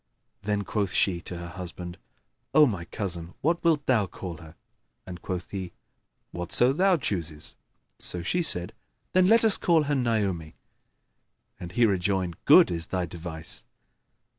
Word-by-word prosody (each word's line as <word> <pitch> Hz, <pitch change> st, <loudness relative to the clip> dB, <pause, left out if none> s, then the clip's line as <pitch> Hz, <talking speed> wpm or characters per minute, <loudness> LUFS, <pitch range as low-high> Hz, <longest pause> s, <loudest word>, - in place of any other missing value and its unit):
Then 105 Hz, 0 st, -1 dB
quoth 100 Hz, -1 st, -2 dB
she 90 Hz, -3 st, +1 dB
to 90 Hz, -, -7 dB
her 85 Hz, 0 st, -7 dB
husband, 90 Hz, 0 st, -7 dB, 0.6 s
"O 155 Hz, -1 st, +8 dB
my 100 Hz, -10 st, -2 dB
cousin, 85 Hz, -2 st, -5 dB
what 165 Hz, +3 st, +1 dB
wilt 155 Hz, -4 st, +2 dB
thou 110 Hz, -6 st, +2 dB
call 90 Hz, -2 st, -7 dB
her?"; 80 Hz, +1 st, -14 dB, 0.5 s
and 90 Hz, -2 st, -9 dB
quoth 90 Hz, -1 st, -5 dB
he, 95 Hz, -3 st, -5 dB, 0.6 s
"Whatso 90 Hz, +9 st, +2 dB
thou 185 Hz, +3 st, +3 dB
chooses"; 85 Hz, -, -4 dB, 0.4 s
so 90 Hz, -1 st, -4 dB
she 175 Hz, -, 0 dB
said, 90 Hz, -, 0 dB, 0.4 s
"Then 185 Hz, 0 st, +4 dB
let 225 Hz, +2 st, +6 dB
us 215 Hz, -, +7 dB
call 165 Hz, -3 st, +3 dB
her 145 Hz, 0 st, -1 dB
Naomi," 105 Hz, -, -1 dB, 1.0 s
and 90 Hz, 0 st, -8 dB
he 120 Hz, -, +4 dB
rejoined 95 Hz, -3 st, -1 dB
"Good -, -, +7 dB
is 85 Hz, -1 st, -3 dB
thy 90 Hz, -1 st, -1 dB
device." 80 Hz, -1 st, -7 dB
95 Hz, 150 wpm, -27 LUFS, 85-125 Hz, 1.0 s, O